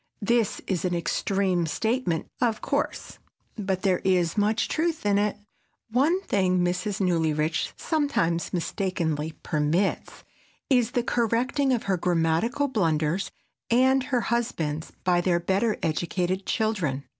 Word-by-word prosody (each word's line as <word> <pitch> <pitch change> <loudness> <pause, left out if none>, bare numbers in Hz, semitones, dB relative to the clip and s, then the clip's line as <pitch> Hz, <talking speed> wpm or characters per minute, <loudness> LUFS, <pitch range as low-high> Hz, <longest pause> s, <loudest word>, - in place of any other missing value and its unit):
This 230 -1 +1
is 185 -3 -1
an 180 -1 0
extreme 180 +1 0
statement, 220 -2 -1 0.2
of 230 -3 +1
course, 285 +1 -3 0.4
but 190 -3 -2
there 185 -3 +2
is 180 -3 +1
much 215 +1 +1
truth 325 -5 -1
in 200 -1 +3
it. 210 0 0 0.5
One 290 +10 +3
thing 185 - +1
Mrs. 185 +3 -2
Newlyrich 160 -3 +1
sometimes 280 - 0
mistakenly 165 -4 -2
permits 155 +6 -1 0.5
is 245 -2 +3
the 245 - +1
correcting 245 +4 +1
of 240 -3 +1
her 195 -2 0
grammatical 175 - +1
blunders 170 - 0 0.4
and 260 +2 +4
her 255 -4 0
husband's 170 -10 -2
by 180 -1 +3
their 175 -1 +2
better 195 +5 +1
educated 175 +4 -1
children. 185 - 0
190 Hz, 125 wpm, -26 LUFS, 170-235 Hz, 0.5 s, and